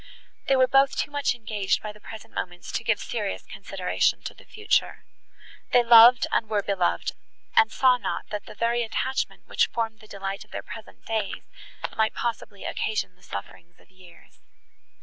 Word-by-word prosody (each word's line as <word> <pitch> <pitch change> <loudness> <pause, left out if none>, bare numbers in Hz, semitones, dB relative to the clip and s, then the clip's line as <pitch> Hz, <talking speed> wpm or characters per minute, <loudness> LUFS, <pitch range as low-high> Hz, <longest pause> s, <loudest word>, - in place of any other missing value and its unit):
They 270 - +4
were 260 -1 +6
both 270 +1 +4
too - - -1
much 285 -3 0
engaged 210 -4 -1
by 215 - -4
the 210 - -16
present 220 0 -10
moments 175 -1 -5
to - - -2
give 220 -2 +2
serious 210 -4 -3
consideration 195 -2 -1
to - - -5
the - - -18
future. 430 0 0 0.7
They 245 - +6
loved 235 +1 +8
and 220 - +1
were 210 -2 +1
beloved, 190 -3 0 0.4
and 455 -1 +5
saw 255 -1 +4
not, - - -3
that 210 -1 -5
the - - -10
very 235 +2 +1
attachment, 260 +3 -2
which - - +2
formed 225 -2 -3
the 215 - -16
delight 195 -1 -5
of - - -26
their - - -6
present 225 -1 -11
days, 220 -3 -2 0.5
might 220 0 +1
possibly 220 -4 -4
occasion 210 -4 -2
the 180 - -29
sufferings 170 +12 -9
of - - -24
years. 185 -2 -19
220 Hz, 175 wpm, -26 LUFS, 195-240 Hz, 0.7 s, loved